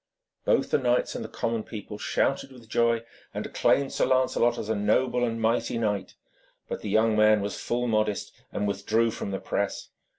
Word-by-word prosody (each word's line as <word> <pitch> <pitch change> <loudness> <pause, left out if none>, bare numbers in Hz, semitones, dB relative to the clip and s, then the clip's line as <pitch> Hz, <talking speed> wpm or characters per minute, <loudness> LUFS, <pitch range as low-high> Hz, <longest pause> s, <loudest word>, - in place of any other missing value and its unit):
Both - - +2
the - - +4
knights 125 -1 +1
and - - -4
the - - -7
common 115 -1 -2
people 105 -1 -8
shouted 135 0 0
with 120 -3 -14
joy, 115 0 +2 0.3
and - - -3
acclaimed 140 -1 +2
Sir - - +1
Lancelot 130 -2 +2
as 105 - -4
a 110 - +1
noble 120 +4 +1
and 115 -1 -1
mighty 115 +1 +1
knight. 105 -4 -1 0.5
But - - -4
the 105 - -4
young 110 +2 +3
man 110 0 +5
was 100 0 -4
full 120 +1 -1
modest, 110 -3 0 0.2
and 105 - -1
withdrew 110 +3 +1
from 105 - -5
the 95 - -2
press. - - -3
115 Hz, 190 wpm, -27 LUFS, 105-120 Hz, 0.5 s, man